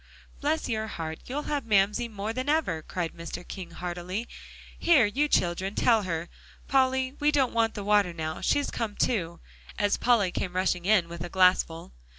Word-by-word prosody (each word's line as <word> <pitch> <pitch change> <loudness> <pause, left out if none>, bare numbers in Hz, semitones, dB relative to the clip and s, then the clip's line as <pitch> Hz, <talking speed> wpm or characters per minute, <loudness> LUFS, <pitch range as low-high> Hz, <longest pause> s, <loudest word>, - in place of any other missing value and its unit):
"Bless 310 +2 0
your 220 -2 -2
heart, 160 -5 -5
you'll 285 +4 -3
have 290 -2 -2
Mamsie 210 +3 +2
more 215 0 -4
than 255 +4 -3
ever," 295 - +1
cried 170 +1 -4
Mr. 170 +1 -7
King 185 -3 -7
heartily. 180 +6 -5 0.5
"Here, 315 -9 +5
you 275 +9 +1
children, 185 -4 0
tell 230 -3 +4
her. 170 -3 -3 0.4
Polly, 260 0 +2
we 295 0 +3
don't 275 -4 +2
want 230 -1 +1
the 205 - -4
water 205 -3 +3
now, 160 -1 -5
she's 285 - +1
come 215 -3 -3
to," 170 -8 0 0.4
as 205 -1 +2
Polly 225 -7 +3
came 180 0 -3
rushing 185 -1 0
in 195 -4 +4
with 170 0 -7
a 175 - -5
glassful. 180 - +2
205 Hz, 175 wpm, -27 LUFS, 175-250 Hz, 0.5 s, Here